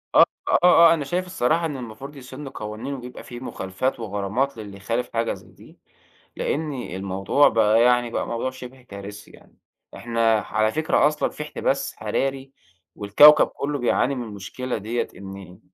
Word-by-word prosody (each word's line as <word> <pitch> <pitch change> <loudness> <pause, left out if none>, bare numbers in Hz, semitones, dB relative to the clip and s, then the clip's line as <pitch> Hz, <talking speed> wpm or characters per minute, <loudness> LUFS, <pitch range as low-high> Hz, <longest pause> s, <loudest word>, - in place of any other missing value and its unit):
آه، - - +9 0.2
آه، - - +3
آه، 170 -2 +7
أنا 150 -4 -2
شايف 180 +5 -1
الصراحة 165 -1 0
إن 150 -4 -3
المفروض 125 +4 -9
يسنُّوا 135 +1 -9
قوانين 110 +6 -5
ويبقى 125 -2 -8
فيه 120 - -9
مخالفات 120 +2 -3
وغرامات 110 +5 -2
للي 100 -3 -9
يخالف 115 +5 -2
حاجة 115 0 0
زي - - -14
دي، - - -18 0.6
لإن 155 0 -2
الموضوع 95 +2 +1
بقى 110 +1 +4
يعني 120 -1 +3
بقى - - -3
موضوع 115 +2 -2
شبه 130 0 -11
كارثي 100 -3 -10
يعني. - - -20 0.4
إحنا 115 -1 +1
على 110 +1 0
فكرة 155 0 +2
أصلًا 150 0 -1
في 150 - -7
احتباس 150 - -2
حراري 135 0 -2 0.4
والكوكب 125 +9 +7
كلّه 145 0 -4
بيعاني 130 +2 +1
من 125 - -4
المشكلة 110 +4 -5
ديَّة، 110 +3 -2
إن 95 -2 -10
120 Hz, 160 wpm, -23 LUFS, 105-140 Hz, 0.6 s, آه